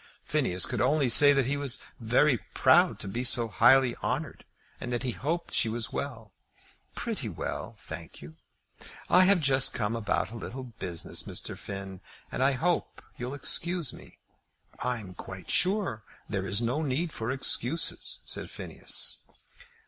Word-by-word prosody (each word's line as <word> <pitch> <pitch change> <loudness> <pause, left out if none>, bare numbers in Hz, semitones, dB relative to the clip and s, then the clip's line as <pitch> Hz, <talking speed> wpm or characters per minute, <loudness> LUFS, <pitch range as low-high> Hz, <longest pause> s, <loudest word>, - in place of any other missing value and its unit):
Phineas 120 - +2
could 120 -4 -2
only 135 +1 +2
say 145 +5 +9
that 135 -2 +3
he 140 +3 -1
was 140 -3 0 0.2
very 125 +3 +3 0.2
proud - - +5
to - - -4
be 115 +6 -3
so 120 -2 +4
highly 125 +2 +5
honoured, - - -4 0.3
and 120 - -5
that 120 +1 -2
he 130 - 0
hoped 165 +8 -3
she 115 - +3
was 115 0 -3
well. 115 -8 -5 0.6
"Pretty - - -3
well, - - -5
I - - -20
thank 80 -1 -8
you. 75 +2 -12 0.8
I 185 +1 +7
have 195 -1 +5
just 135 -3 +3
come 110 +1 -1
about 110 -1 -1
a - - -8
little 130 +3 -6
business, 95 -9 -2
Mr. - - -3
Finn, 95 -1 -7 0.3
and - - -3
I 135 +1 +4
hope 170 +7 -1
you'll 125 +3 -5
excuse 170 0 0
me." - - -14 0.7
"I'm 115 -7 -3
quite 95 -1 -8
sure 185 - +2 0.3
that - - -14
there 95 -1 -1
is 100 +5 0
no 125 +7 0
need 155 +3 -1
for 110 +1 -4
excuses," 135 +3 0
said - - -6
Phineas. - - -3
125 Hz, 165 wpm, -28 LUFS, 110-145 Hz, 0.8 s, say